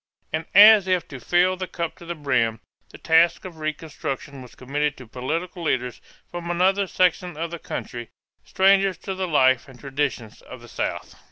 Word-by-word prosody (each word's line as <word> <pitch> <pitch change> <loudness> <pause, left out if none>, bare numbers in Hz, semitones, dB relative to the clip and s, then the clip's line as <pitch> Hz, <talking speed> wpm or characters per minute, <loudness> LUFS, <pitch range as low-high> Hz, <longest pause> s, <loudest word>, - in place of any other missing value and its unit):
And 160 +1 -2
as 205 -1 +9
if 185 -3 0
to 135 - -8
fill 180 +6 +2
the 185 0 -4
cup 170 -2 -4
to 170 - -13
the 170 - -4
brim, 125 -7 0 0.3
the - - -13
task 165 +2 +3
of 175 -3 -9
reconstruction 145 -3 -5
was 125 - -13
committed 145 +3 -2
to 125 - -11
political 160 +10 -4
leaders 125 -6 -2 0.3
from 175 -1 -6
another 190 +3 +2
section 180 -2 0
of 165 +1 -4
the 170 - -6
country, 120 -6 -6 0.3
strangers 195 -1 +3
to 195 - -6
the 190 0 -3
life 130 -5 +3
and 125 -2 -15
traditions 135 -5 -4
of - - -12
the - - -13
South. - - -4
165 Hz, 180 wpm, -23 LUFS, 135-180 Hz, 0.3 s, as